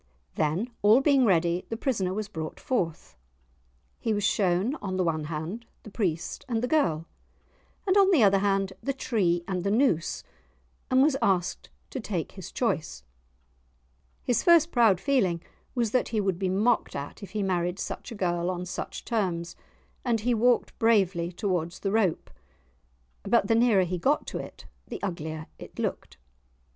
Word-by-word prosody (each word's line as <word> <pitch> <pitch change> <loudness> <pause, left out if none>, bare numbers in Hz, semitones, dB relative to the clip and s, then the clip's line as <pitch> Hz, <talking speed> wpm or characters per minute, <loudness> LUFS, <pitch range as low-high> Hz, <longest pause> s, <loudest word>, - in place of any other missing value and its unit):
Then, 165 +11 -1
all 215 +4 +6
being 275 -2 +4
ready, 175 -2 +2
the 225 - -3
prisoner 210 -8 -1
was 210 +2 -3
brought 160 -6 -6
forth. 175 - -2 0.8
He 225 -2 0
was 205 - -1
shown 190 +4 +2
on 185 -2 -3
the 185 - +2
one 160 -3 -1
hand 165 +9 -5 0.2
the 215 - -11
priest 175 -6 -2
and 230 -1 0
the - - +1
girl, 170 - +1 0.8
and 380 -1 +2
on 395 -1 +6
the 325 - +5
other 195 -1 +5
hand 195 -1 +1
the 275 - -1
tree 180 -10 0
and 185 -2 -2
the 200 - 0
noose, 210 - +1 0.7
and 260 0 +5
was 290 -2 +3
asked 185 -2 0 0.2
to 265 - -4
take 195 -7 -3
his 190 -4 -9
choice. 155 - -2 1.2
His 245 - +1
first 340 -2 +5
proud 225 -7 +4
feeling 215 -12 +1 0.4
was 235 -4 0
that 255 - +1
he 220 - -1
would 190 -3 0
be 190 -1 0
mocked 215 +6 +1
at 140 0 -6
if 200 - -10
he 210 -2 -1
married 180 -1 0
such 240 - -6
a - - -6
girl 175 -3 0
on 180 -1 -3
such 180 - -6
terms, 175 -7 -1 0.5
and 235 -4 +1
he 245 +2 +1
walked 240 +2 +2
bravely 190 -6 +2
towards 180 -3 -2
the 195 - -1
rope. 205 -6 +1 0.9
But 220 0 +2
the 225 - +2
nearer 225 -4 +4
he 180 0 -3
got 280 - +1
to - - -4
it - - -9 0.2
the - - -6
uglier 160 -4 -4
it - - -11
looked. - - -4
195 Hz, 170 wpm, -27 LUFS, 175-235 Hz, 1.2 s, all